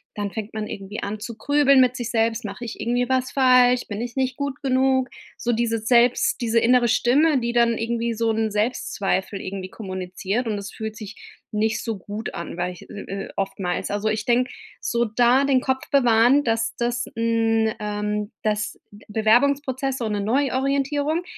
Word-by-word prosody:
dann 205 -1 -3
fängt 220 -1 -6
man 215 -1 -4
irgendwie 195 +2 -6
an 205 +1 -4
zu 230 0 -7
grübeln 275 +1 +4
mit 250 0 +3
sich 240 -2 -4
selbst: 225 0 +1
„Mache 205 +4 -6
ich 230 - -7
irgendwie 245 +1 0
was 260 -1 0
falsch, 250 -2 +4
bin 205 +1 -5
ich 240 0 -5
nicht 260 -1 0
gut 280 -2 -4
genug“, 260 -1 +2 0.3
so 240 -1 -1
diese 230 0 0
selbst 240 +2 +3
diese 230 0 +2
innere 240 +1 +4
Stimme, 285 +6 +3
die 235 0 -2
dann 235 -1 +3
irgendwie 235 +1 -1
so 225 0 0
'n 220 0 0
Selbstzweifel 205 -3 -1
irgendwie 185 0 -6
kommuniziert 190 +3 -4
und 210 - -1
das 200 0 -7
fühlt 220 -1 -6
sich 215 -1 -8 0.4
nicht 220 +1 0
so 225 -3 -3
gut 205 +4 -6
an, 170 0 -6
weil 180 0 -2
ich 175 - -14
äh, - - -10 0.3
äh, - - -12
oftmals. 195 -2 -2
Also, 205 +1 0
ich 215 0 -2
denke, 250 +1 +2 0.3
so 235 0 0
da 245 +5 +3
den 265 -2 +3
Kopf 265 0 -2
bewahren, 245 +1 +5
dass 225 -1 0
das 240 0 -1
hm, 225 -1 +1
ähm, 210 0 -3
das 210 -1 -1
B 205 +1 -16
Bewerbungsprozess 260 +5 +2
so 230 - -2
'ne 210 -1 -1
Neuorientierung, 280 - 0
230 Hz, 180 wpm, -23 LUFS, 210-255 Hz, 0.4 s, bewahren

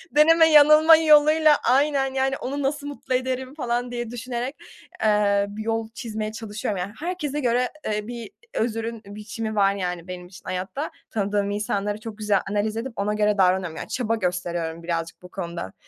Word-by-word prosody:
deneme 325 +2 +7
yanılma 305 +2 +8
yoluyla 305 0 +6
aynen, 270 +1 +2
yani, 270 0 0
onu 280 +2 -4
nasıl 290 +1 -2
mutlu 285 -2 -5
ederim 260 +1 -2
falan 245 -3 -2
diye 240 -2 -4
düşünerek, 245 +3 -4 0.5
eee, 205 -1 +3
bir 215 +1 -6
yol 225 0 -2
çizmeye 215 -3 -4
çalışıyorum. 210 -2 -4
Yani, 195 +3 -4
herkese 310 -4 -3
göre, 250 -1 +1 0.2
eee, 210 0 -2
bir 235 -3 -7 0.2
özrün 225 0 -2
biçimi 215 +2 -6
var, 200 -1 +4
yani, 180 -2 -4
benim 180 -1 -7
için 180 0 -15
hayatta. 190 +11 -4 0.2
Tanıdığım 205 -1 0
insanları 205 0 -2
çok 220 -1 -8
güzel 210 -2 +2
analiz 210 +1 -1
edip 235 +1 -4
ona 205 +1 -1
göre 210 -1 +1
davranıyorum. 185 -3 +2
Yani, - - -6
çaba 230 -3 0
gösteriyorum 175 -4 -3
birazcık 165 0 -3
bu 180 - -11
konuda. 170 - -6
220 Hz, 165 wpm, -24 LUFS, 200-265 Hz, 0.5 s, yanılma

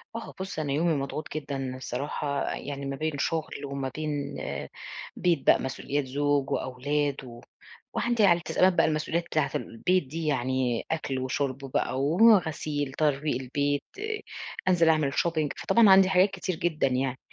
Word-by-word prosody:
آه، 230 - -6
بُص، 190 -4 -4
أنا 145 -3 -1
يومي 165 +2 +2
مضغوط 140 +2 -4
جدًا 135 -3 -3
الصراحة، 140 +3 -3
يعني 140 0 -6
ما 135 0 -3
بين 155 +2 -1
شُغل 155 -1 -2
وما 135 -1 -3
بين 150 -2 -3 0.8
بيت 170 -6 0
بقى، - - +7
مسؤوليات 135 +2 -2
زوج 145 +1 0
وأولاد 140 +2 -1
و 120 -1 -11 0.5
وعندي 235 -3 +2
على 175 -2 +5
التزامات 185 +2 +3
بقى، - - +4
المسؤوليّات 160 +2 -1
بتاعة 155 -3 0
ال - - 0
البيت 180 +11 +1
دي 160 +3 -4
يعني، 130 -3 0
أكْل 140 -5 -2
وشُرب 130 +1 -1 0.2
بقى 130 - 0
وغسيل، 155 -6 +3
ترويق 145 -3 0
البيت، 145 +2 0 0.9
أنزِل 170 -3 +4
أعمل 155 -3 +3
shopping 160 -3 +1
فطبعًا 225 -4 +4
عندي 190 -1 +7
حاجات 190 +1 +4
كتير 185 -2 -3
جدًا 160 -4 0
يعني، 130 0 -1
145 Hz, 150 wpm, -27 LUFS, 135-165 Hz, 0.9 s, بقى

